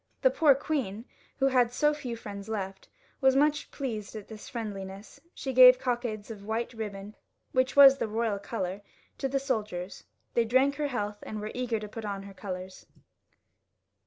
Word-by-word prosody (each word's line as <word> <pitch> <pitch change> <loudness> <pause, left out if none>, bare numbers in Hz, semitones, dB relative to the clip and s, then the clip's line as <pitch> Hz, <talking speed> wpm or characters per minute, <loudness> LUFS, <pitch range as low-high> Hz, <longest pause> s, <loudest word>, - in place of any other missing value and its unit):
The - - +6
poor 295 -4 +5
queen, 250 -7 -3 0.3
who 270 - +2
had 250 -3 +3
so 295 +4 +2
few 265 -6 -5
friends 205 -2 -8
left, 195 -3 -5 0.3
was 265 0 +5
much 300 +2 +2
pleased 225 -7 -5
'at 210 -2 -8
this 215 -1 -9
friendliness; 200 0 -7 0.2
she 265 - -4
gave 255 0 +9
cockades 235 -4 -3
of 205 -2 -9
white 225 +3 -2
ribbon, 210 -2 -6 0.4
which 255 +1 +1
was 275 -1 +9
the - - 0
royal 220 -1 -1
colour, 195 -2 -4 0.4
to 270 - 0
the 270 +1 0
soldiers; 210 -9 -3 0.3
they 235 - +3
drank 260 +5 +2
her 300 -1 0
health, 210 -5 -3
and 215 - -6
were 215 +1 -5
eager 245 -3 -1
to 210 - -6
put 225 +2 -8
on 200 -2 -4
her 200 0 -10
colours. 185 -1 -7
225 Hz, 175 wpm, -29 LUFS, 205-260 Hz, 0.4 s, gave